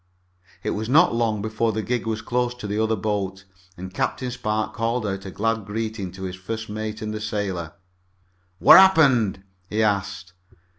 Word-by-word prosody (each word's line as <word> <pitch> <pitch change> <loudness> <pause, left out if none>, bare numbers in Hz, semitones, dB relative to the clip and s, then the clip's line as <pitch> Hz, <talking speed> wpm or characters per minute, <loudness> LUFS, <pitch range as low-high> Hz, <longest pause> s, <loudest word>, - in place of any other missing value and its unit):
It - - -1
was 110 +2 -3
not 160 +2 +5
long 110 -3 0
before 110 +1 0
the 110 +1 -2
gig 120 -1 -2
was 110 -1 -2
close 125 0 -1
to 125 - -9
the 105 +1 -1
other 110 0 +1
boat, 95 -3 -3 0.3
and 95 +1 -8
Captain 125 +5 -2
Spark 110 -3 -2
called 115 0 -1
out 95 -1 -4
a - - -5
glad 115 +3 -1
greeting 105 -2 -4
to 95 0 -9
his 95 -1 -4
first 110 +4 -6
mate 110 +1 -5
and 110 0 -3
the 110 - -5
sailor. 95 -6 -3 0.8
"What 100 - +9
happened?" 135 - +4 0.3
he 110 +1 +1
asked. 100 -3 -1
110 Hz, 180 wpm, -23 LUFS, 100-115 Hz, 0.8 s, What